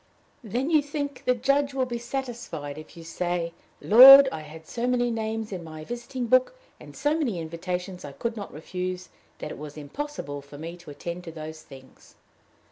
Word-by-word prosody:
"Then 245 - -2
you 310 -2 +5
think 285 -1 -5
the 250 - +3
Judge 275 +3 +1
will 260 -1 +1
be 240 -1 -4
satisfied 235 - -5
if 155 - -13
you 165 - -9
say, 170 0 -2 0.3
'Lord, 270 +5 +10
I - - -4
had 160 +1 -11
so 235 +8 -3
many 245 -1 +1
names 220 -1 -3
in 180 -3 -5
my 155 -1 -9
visiting 240 - -5
book, 255 - +3 0.2
and - - -13
so 295 +1 +1
many 250 - -1
invitations 180 +3 -5
I 145 -1 -8
could 230 - -3
not 205 -3 -7
refuse, 180 +3 -5 0.3
that 150 - -6
it - - -8
was 150 0 -8
impossible 145 - -5
for 145 +1 -13
me 165 +3 -6
to 170 -3 -14
attend 170 +4 -6
to 165 - -6
those 155 0 -8
things'?" 130 -1 -16
185 Hz, 190 wpm, -26 LUFS, 160-250 Hz, 0.3 s, Lord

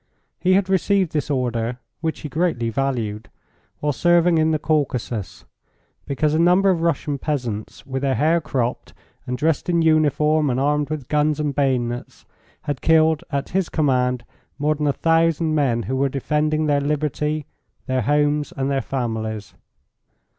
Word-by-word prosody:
He 185 +1 +3
had 190 0 +3
received 190 -1 +2
this 150 -1 -2
order, 120 -3 -1 0.2
which 160 0 -3
he - - -5
greatly 150 -7 -1
valued, 115 -4 -2 0.5
while 150 0 0
serving 175 +2 +3
in 155 0 +3
the 155 - +2
Caucasus, 125 - -2 0.6
because 150 +2 0
a 155 - +2
number 180 +3 +4
of 170 -3 -1
Russian 150 -3 -1
peasants, 125 -9 -4
with 135 -1 -4
their 135 -2 +1
hair 165 +3 +2
cropped, 125 -5 -3 0.3
and 125 0 -2
dressed 160 +4 0
in 170 -1 +2
uniform 155 -1 +3
and 125 0 0
armed 145 +1 +1
with 150 -4 -4
guns 150 0 +1
and 150 -2 -1
bayonets, 125 -3 -2 0.4
had 145 -5 -3
killed 160 -1 +3
at 140 -1 -2
his 190 -1 0
command 125 -5 +1 0.3
more 150 +2 +1
than 150 0 -2
a - - +4
thousand 165 +1 +2
men 130 -6 +1
who 130 - -3
were 135 +1 +1
defending 150 +3 0
their 145 -1 +2
liberty, 150 +1 -1 0.4
their 130 -1 0
homes, 145 +3 +1
and 135 +1 -1
their 135 -1 +1
families. 110 -6 -4
145 Hz, 160 wpm, -22 LUFS, 130-155 Hz, 0.6 s, number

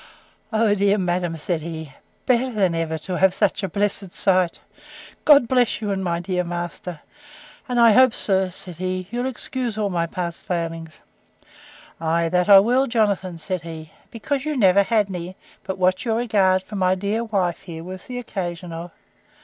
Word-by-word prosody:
O, 220 -1 +3
dear 200 0 +2
madam! 175 -3 -1
said 160 +1 -2
he, 160 -2 -7 0.3
better 255 +1 +2
than 195 -6 +1
ever, 165 -1 -2
to 175 +3 -4
have 190 0 +4
such 205 -1 +1
a 195 - -3
blessed 200 0 -1
sight! 185 -2 +1 0.7
God 285 -5 +7
bless 250 -1 +2
you 210 -2 -2
and 190 -1 -2
my 170 -2 -1
good 180 0 -1
master!—and 245 - -7
I 230 -1 +7
hope, 255 +2 +5
sir, 190 -2 +1
said 180 -1 -2
he, 185 0 -3
you'll 245 +2 -2
excuse 250 -2 -4
all 205 -2 -1
my 170 -1 0
past 170 0 -5
failings. 165 -2 -3 1.1
Ay, 165 +1 0
that 180 +2 +1
I 200 - +10
will, 245 +7 +4
Jonathan, 200 -6 0
said 180 +2 -4
he; 160 -2 -9 0.2
because 260 +4 -3
you 305 -1 -2
never 195 -3 +5
had 210 0 +1
any, 180 0 -6 0.3
but 190 -1 -4
what 185 0 +1
your 225 -3 0
regard 200 -5 +2
for 210 - -9
my 185 -1 +2
dear 205 +4 -1
wife 190 -6 -1
here 165 -1 -8
was 185 +1 -9
the 250 - -6
occasion 180 -7 -5
of. 170 +2 -6
190 Hz, 175 wpm, -22 LUFS, 175-220 Hz, 1.1 s, I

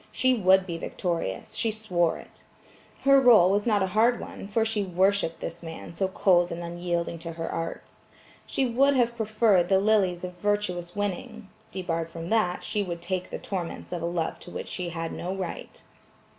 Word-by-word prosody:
She 255 0 +3
would 190 -4 +4
be 170 -3 -5
victorious; 165 - -3
she 225 - 0
swore 185 -6 0
it. - - -15 0.6
Her 275 0 +6
rôle 215 -8 +7
was 205 +3 +1
not 210 -3 +3
a 190 0 -3
hard 235 +3 +4
one - - -8
for 220 +2 +1
she 220 -2 0
worshipped 190 -1 +1
this 170 +1 -5
man 165 0 -8
so 190 +3 0
cold 180 -2 +3
and 170 +1 -4
unyielding 170 0 -3
to 165 0 -6
her 165 0 -4
arts. 165 0 -5 0.5
She 270 - 0
would 270 +4 +3
have 240 -2 +2
preferred 215 -5 +2
the 190 - +5
lilies 195 -4 +2
of 180 0 -5
virtuous 180 -3 -1
winning; 205 +2 -4 0.2
debarred 165 -3 -3
from 165 +2 -7
that 195 -6 +1
she 215 -1 -1
would 170 -3 -5
take 185 0 -3
the - - -4
torments 180 -4 -5
of 175 -2 -3
a 170 - -1
love 170 -2 -2
to - - -11
which - - -6
she 180 -2 -3
had 165 -1 -4
no 185 +2 -4
right. 185 -3 -6
185 Hz, 190 wpm, -27 LUFS, 175-215 Hz, 0.6 s, rôle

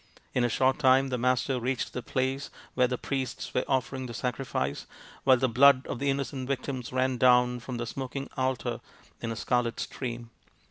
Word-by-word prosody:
In 125 - +2
a 120 - +2
short 130 +4 +2
time 135 -1 +5
the 125 - -1
Master 125 +1 +1
reached 125 +1 -2
the 125 - -3
place 130 +3 -2 0.2
where 125 0 +3
the 125 0 -2
priests 130 -2 -4
were 125 - +1
offering 130 0 -1
the 120 - -7
sacrifice, 125 - -2 0.4
while 130 -1 +7
the 130 +2 +2
blood 130 +2 +6
of - - -4
the 140 - 0
innocent 135 -1 -2
victims 130 -2 -3
ran 130 0 +1
down 125 0 +4
from 125 0 -6
the 120 - -3
smoking 135 +3 -5
altar 130 -1 -1 0.4
in 115 - -3
a - - -3
scarlet 120 +1 0
stream. 120 -2 -5
130 Hz, 185 wpm, -28 LUFS, 125-135 Hz, 0.4 s, while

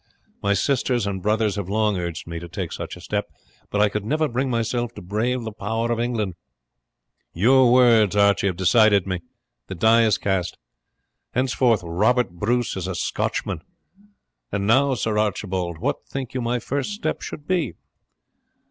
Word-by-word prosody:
My 100 0 +2
sisters 125 +1 +1
and 95 -2 -3
brothers 105 0 +1
have 100 -2 -4
long 105 0 +1
urged 85 -2 -4
me 85 0 -6
to 85 - -8
take - - -4
such - - -6
a - - -12
step, - - -3 0.4
but 105 - -1
I 105 - +5
could 105 0 -3
never 155 +7 +1
bring 130 +1 -1
myself 120 0 -1
to - - -8
brave 115 +7 -1
the 110 - -5
power 115 +3 -2
of 115 - 0
England. 115 -5 -1 1.0
Your 125 +7 +5
words 115 -6 +5
have 100 -2 +3
decided 100 +1 +4
me. 95 -2 -2 0.5
The 95 - -6
die 115 +6 +5
is 110 -2 +3
cast. 95 -3 -1 0.8
Henceforward 125 -3 +2
Robert 100 +6 +1
Bruce 120 +7 -1
is 95 -1 -4
a 95 - -3
Scotchman. 80 - -2 0.9
And 100 0 -1
now, 135 +5 +4
Sir 110 -2 -1
Archibald, 95 -5 -2
what - - -2
think 135 -3 -5
you 130 - -2
my 120 +1 0
first 140 - -3
step 180 -7 -3
should 145 - -7
be?" 170 - 0
110 Hz, 165 wpm, -23 LUFS, 100-125 Hz, 1.0 s, I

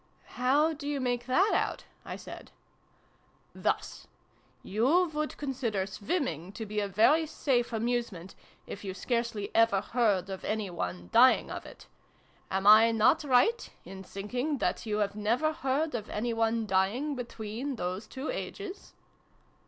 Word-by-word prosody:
"How 285 +6 +2
do 285 -1 -7
you 290 -1 -1
make 245 -1 -1
that 365 +12 +3
out?" - - 0 0.2
I - - -6
said. - - -10 0.5
" - - -37
Thus. - - -2 0.6
You 300 - +2
would 305 0 -3
consider 245 -9 -2
swimming 195 - -3
to 220 - -6
be 210 0 -3
a 205 - -1
very 295 - +4
safe 250 -5 0
amusement, 225 -6 -2 0.3
if 200 - -8
you 190 -2 -5
scarcely 235 -3 -2
ever 225 -3 +4
heard 200 -5 0
of 190 - -6
any 215 -3 -2
one 90 - -5
dying - - +5
of - - -6
it. - - -13 0.6
Am 190 +1 -1
I 215 +2 +8
not 225 +6 +3
right 290 - +3 0.2
in 190 0 -9
thinking 245 +10 -3
that 225 0 -2
you 210 -1 +1
never 235 +9 0
heard 295 +2 -1
of 220 -3 -4
any 230 +3 -2
one 225 0 +1
dying 205 +10 +1
between 245 +1 -5
those 185 +1 -4
two 265 - -5
ages 405 -5 -7
230 Hz, 150 wpm, -29 LUFS, 205-270 Hz, 0.6 s, I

